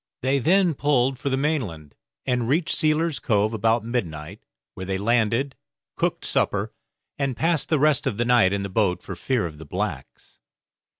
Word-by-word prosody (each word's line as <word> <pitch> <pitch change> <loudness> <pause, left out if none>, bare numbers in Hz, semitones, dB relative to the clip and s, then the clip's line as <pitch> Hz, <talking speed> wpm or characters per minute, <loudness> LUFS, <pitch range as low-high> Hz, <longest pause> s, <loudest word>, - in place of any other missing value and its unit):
They 135 +2 +2
then 180 +5 +3
pulled 135 -2 +1
for 140 - -2
the 130 - 0
mainland, 115 - -2 0.3
and 125 -3 0
reached 155 +4 +1
Sealer's 155 0 +1
Cove 105 0 +1
about 115 +1 +1
midnight, 85 -11 -4 0.3
where 95 - -7
they 95 0 -1
landed, 115 +5 +1 0.4
cooked - - -1
supper, - - 0 0.5
and 135 -4 -1
passed 165 -1 +1
the 155 - +3
rest 145 -1 +2
of 110 -6 -2
the 120 - +1
night 120 -6 +4
in 100 0 -1
the 100 - -4
boat 95 -3 0
for 95 - -6
fear 120 +4 -1
of 75 -3 -7
the - - -8
blacks. - - -5
120 Hz, 175 wpm, -24 LUFS, 100-140 Hz, 0.5 s, night